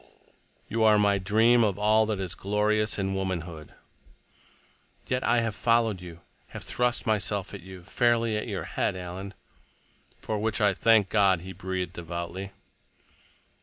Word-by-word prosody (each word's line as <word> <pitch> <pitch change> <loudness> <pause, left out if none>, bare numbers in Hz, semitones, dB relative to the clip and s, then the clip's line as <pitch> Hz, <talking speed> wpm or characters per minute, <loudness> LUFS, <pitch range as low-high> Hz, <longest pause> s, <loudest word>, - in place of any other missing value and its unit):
"You 115 0 0
are 110 -1 +6
my 100 -1 +3
dream 110 +5 +4
of 100 -3 0
all 110 +1 +3
that 110 -2 -1
is 95 -3 -3
glorious 105 +2 0
in 95 -1 -1
womanhood." 85 -5 -4 1.3
"Yet 125 0 -1
I 120 - +3
have 115 -2 -2
followed 115 -4 +1
you—have 85 -1 -11
thrust 125 -1 0
myself 105 -2 -1
at 100 - -7
you, 95 0 -11
fairly 115 +3 +1
at 105 - -3
your - - -4
head, - - -2
Alan." 95 +2 -7 0.8
"For 110 -1 -3
which 110 +1 -1
I 105 -2 +3
thank 110 -1 +3
God," 95 -3 +3
He 95 +2 -8
breathed 95 0 -4
devoutly. 85 +2 -6
100 Hz, 145 wpm, -27 LUFS, 95-110 Hz, 1.3 s, are